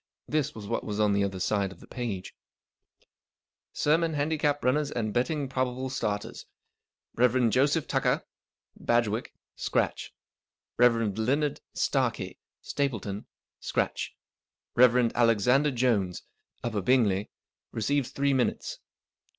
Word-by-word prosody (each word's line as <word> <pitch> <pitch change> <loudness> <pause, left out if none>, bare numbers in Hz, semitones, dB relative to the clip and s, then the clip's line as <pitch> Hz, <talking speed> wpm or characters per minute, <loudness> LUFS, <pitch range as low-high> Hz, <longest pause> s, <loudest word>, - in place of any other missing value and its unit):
This 150 -1 0
was 110 -2 -8
what - - -2
was 105 0 -4
on 105 -1 +3
the 100 0 +2
other 95 -1 -2
side 100 +1 0
of - - -13
the - - -13
last - - -35
page:— 110 -7 -4 1.4
SERMON 160 +1 +2
HANDICAP 145 0 0
RUNNERS 140 +3 +2
AND 110 -6 -2
BETTING 140 +4 0
PROBABLE 130 0 -2
STARTERS. 105 -6 -3 0.7
Rev. 125 -1 +3
Joseph 140 +5 +2
Tucker - - +1 0.5
(Badgwick), 120 -1 +1 0.3
scratch. - - -1 0.7
Rev. 115 -4 +4
Leonard 140 +6 0
Starkie - - 0 0.2
(Stapleton), 110 -8 -2 0.3
scratch. - - -2 0.6
Rev. 125 -1 +5
Alexander 120 +5 +4
Jones 115 -9 0 0.4
(Upper 110 -4 -1
Bingley), 105 -3 +2 0.4
receives 130 +4 0
three 140 0 +1
minutes. 130 -2 -1
125 Hz, 115 wpm, -28 LUFS, 105-140 Hz, 1.4 s, Rev